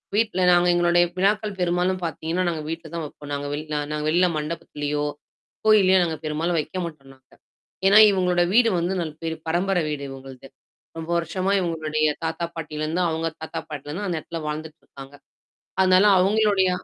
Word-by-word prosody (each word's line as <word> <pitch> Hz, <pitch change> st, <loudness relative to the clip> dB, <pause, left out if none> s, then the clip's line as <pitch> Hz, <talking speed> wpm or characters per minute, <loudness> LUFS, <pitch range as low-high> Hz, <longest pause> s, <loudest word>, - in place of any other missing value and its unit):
வீட்ல 215 Hz, -4 st, +1 dB
நாங்க 175 Hz, 0 st, +4 dB
எங்களுடைய 175 Hz, 0 st, +3 dB
விழாக்கள் 205 Hz, +2 st, +1 dB
பெரும்பாலும் 180 Hz, +1 st, 0 dB
பாத்தீங்கன்னா, 165 Hz, +3 st, -2 dB
நாங்க 160 Hz, -2 st, -3 dB
வீட்ல 165 Hz, +1 st, -6 dB
தான் 165 Hz, -1 st, -3 dB
வைப்போம். 145 Hz, 0 st, -10 dB
நாங்க 145 Hz, 0 st, -3 dB
வெள 150 Hz, -, -3 dB
நா -, -, 0 dB
நாங்க 150 Hz, 0 st, -3 dB
வெளில 175 Hz, +3 st, +3 dB
மண்டபத்திலயோ, 150 Hz, -1 st, -3 dB, 0.6 s
கோவில்லயோ 195 Hz, -3 st, +5 dB
நாங்க 160 Hz, -2 st, -2 dB
பெரும்பாலும் 160 Hz, +3 st, -1 dB
வைக்க 155 Hz, +5 st, -5 dB
மாட்டோம் 145 Hz, -5 st, -10 dB
நாங்க. 130 Hz, 0 st, -33 dB, 0.6 s
ஏன்னா, 205 Hz, +2 st, +7 dB
இவங்களோட 180 Hz, -2 st, +2 dB
வீடு 235 Hz, 0 st, +5 dB
வந்து 175 Hz, +3 st, -1 dB
ந -, -, -2 dB, 0.2 s
பேரு 160 Hz, 0 st, -3 dB
பரம்பர 180 Hz, +2 st, +1 dB
வீடு 145 Hz, -2 st, -4 dB
இவுங்கள்து. 135 Hz, 0 st, -11 dB, 0.5 s
ரொம்ப 165 Hz, +1 st, -6 dB
வருஷமா 185 Hz, +4 st, -1 dB
இவங்களுடைய 155 Hz, -3 st, 0 dB, 0.2 s
தாத்தா, 160 Hz, +1 st, -2 dB
பாட்டியிலருந்தும், 160 Hz, +2 st, -2 dB
அவங்க 165 Hz, +1 st, -1 dB
தாத்தா 160 Hz, -, -5 dB
பாட்டிலருந்து 150 Hz, +6 st, -5 dB
அந்த 170 Hz, -3 st, -1 dB
இடத்துல 165 Hz, +1 st, -7 dB
வாழ்ந்துட்டு 155 Hz, +1 st, -6 dB
இருக்காங்க. 135 Hz, +1 st, -12 dB, 0.7 s
அதனால, 185 Hz, +1 st, +5 dB
அவங்களுடைய 200 Hz, 0 st, +3 dB
165 Hz, 160 wpm, -23 LUFS, 150-185 Hz, 0.7 s, ஏன்னா